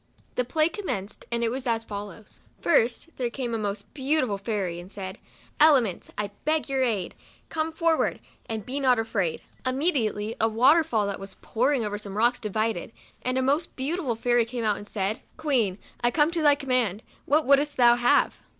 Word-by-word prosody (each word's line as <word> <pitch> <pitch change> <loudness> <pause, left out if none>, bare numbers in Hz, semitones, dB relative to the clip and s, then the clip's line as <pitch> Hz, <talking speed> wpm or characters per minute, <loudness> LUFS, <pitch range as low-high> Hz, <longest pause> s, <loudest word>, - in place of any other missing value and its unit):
The 250 - 0
play 310 +5 +2
commenced, 275 - -4
and 235 0 +1
was 260 +1 -3
as 230 -1 +1
follows: 205 0 -8 0.2
First, 250 0 +2
there 245 -2 -1
came 240 -1 -4
a 225 - -1
most 200 -1 -4
beauti 290 +1 +1
ful 200 -4 -3
fairy, 195 -5 -2
and 180 +2 -11
said, 190 0 -6 0.2
" - - -29
Elements, 240 - +1
I 205 -1 -2
beg 310 +1 +1
your 270 -1 0
aid; 215 -8 0 0.4
come 320 0 -1
forward! 325 0 +1 0.3
and 220 -3 -4
be 270 +3 -2
not 255 -3 +4
afraid." 205 -7 -1 0.2
Immediately 255 -6 0
a 225 - +4
water 260 +9 +5
fall 225 -9 0
that 200 -1 -3
was 195 0 -8
pouring 250 +1 +1
over 205 0 -3
some 200 -1 -7
rocks 240 +3 +3
divided, 215 -2 -2 0.3
and 255 +1 -1
a 260 - +1
most 290 +6 0
beau 275 +6 -1
tiful 280 -11 -2
fairy 240 +1 +2
came 235 +1 -5
out, 210 -2 +1
and 205 - -9
said, 205 +1 -2
" - - -36
Queen, 240 -11 +1 0.3
I 240 - +5
come 295 +4 +3
at - - -7
thy 305 -4 +4
command, 255 -7 0 0.2
what 300 +2 +3
would'st 285 +2 +3
thou 240 -1 +7
have 245 0 +3
240 Hz, 195 wpm, -26 LUFS, 210-275 Hz, 0.4 s, thou